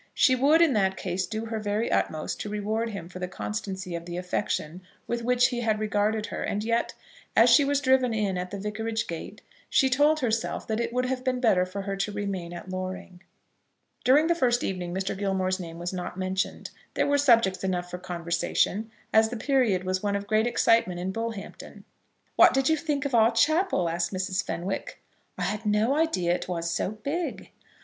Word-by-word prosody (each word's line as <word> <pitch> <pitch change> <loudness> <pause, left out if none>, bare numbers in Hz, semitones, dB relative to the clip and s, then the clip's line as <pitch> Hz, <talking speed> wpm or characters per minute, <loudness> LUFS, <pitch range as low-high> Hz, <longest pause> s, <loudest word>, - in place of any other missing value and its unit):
She 260 - +5
would, 295 +6 +5
in 315 -5 +3
that 190 -3 +1
case, 185 0 -2
do 220 +1 -4
her 225 -1 -3
very 210 +2 -1
utmost 155 -1 -1
to 210 - -4
reward 215 +2 -2
him 200 -5 -6
for 180 +1 -9
the 180 - -3
constancy 190 -1 -5
of 170 0 -5
the 175 0 -5
affection 180 -1 -2 0.2
with 235 0 -2
which 250 +1 +3
he 245 - -3
had 220 -2 +1
regarded 215 0 0
her; - - -5
and 205 +1 -2
yet, 230 +1 0 0.4
as - - +6
she 290 - +7
was 280 0 +1
driven 260 -2 +3
in 210 -4 0
at 180 0 -3
the 200 - -5
vicarage 220 +2 -3
gate, 165 -1 -7 0.3
she 265 -1 +3
told 295 +4 +4
herself 225 -2 -1
that 220 -2 -2
it 235 0 -1
would 250 +1 0
have 255 0 -2
been 255 -1 0
better 190 -7 +3
for 195 +2 -5
her 195 0 -3
to 195 +2 -1
remain 200 -4 -4
at 175 +1 -8
Loring. 185 -1 -6 0.8
During 285 +5 +5
the 340 - +3
first 245 -7 +1
evening 180 -2 -3
Mr. 190 +1 -2
Gilmore's 190 -1 -1
name 165 -2 -7
was 175 +2 -4
not 180 0 -5
mentioned. 190 0 -2 0.2
There - - +2
were 285 0 +2
subjects 230 -10 +4
enough 180 -2 -2
for 180 - -5
conversation, 175 +4 -1 0.2
as 220 0 +5
the 240 - -5
period 230 -7 +2
was 185 0 -1
one 205 -1 0
of 200 0 -3
great 215 +2 +2
excitement 230 -6 +2
in 185 +2 -2
Bullhampton. 225 -1 -6 0.5
"What - - +7
did 270 +1 +2
you 320 - +4
think 295 -2 -2
of 280 - -2
our 225 -1 +6
chapel?" 300 - +2
asked 170 +1 -1
Mrs. 185 0 -1
Fenwick. 180 +4 -4 0.4
"I - - -2
had 210 +1 -2
no 215 +5 +2
idea 190 - +1
it - - -3
was 170 -2 -2
so 175 - -1
big." 280 - -4
210 Hz, 205 wpm, -27 LUFS, 185-240 Hz, 0.8 s, she